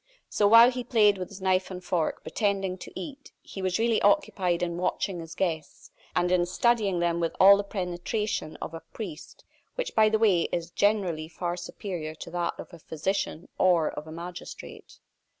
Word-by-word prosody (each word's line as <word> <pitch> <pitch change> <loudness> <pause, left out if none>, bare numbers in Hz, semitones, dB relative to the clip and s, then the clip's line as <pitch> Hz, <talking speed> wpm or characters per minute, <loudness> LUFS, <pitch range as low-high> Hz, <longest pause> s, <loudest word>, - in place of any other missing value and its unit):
So 205 - +2
while 230 +3 +8
he 250 -1 -4
played 210 -5 +3
with 180 - -5
his 195 -1 -11
knife 185 0 +2
and 180 -1 -7
fork, 175 -5 -1
pretending 195 -3 -1
to - - -9
eat, 285 -2 -9
he 195 - -8
was 185 -1 0
really 225 0 +2
occupied 185 -3 +2
in 170 -1 -2
watching 185 0 -1
his 165 0 -9
guests, 165 -5 -3 0.2
and 180 0 +2
in 175 -1 +3
studying 210 -1 +2
them 170 0 0
with 165 -1 -1
all 195 +1 +9
the 200 - -1
penetration 185 -2 -3
of - - -6
a 165 - -5
priest, 165 0 -9 0.3
which, - - -3
by 215 -1 +5
the 220 - +2
way, 200 -6 +3
is 170 0 -3
generally 190 -7 +1
far 175 +1 -3
superior 175 -3 -6
to - - -9
that 175 0 -2
of - - -9
a 170 - -11
physician 165 +2 -3
or 175 -4 +3
of 150 +1 -8
a - - -8
magistrate. 175 +2 -9
185 Hz, 185 wpm, -27 LUFS, 170-205 Hz, 0.3 s, all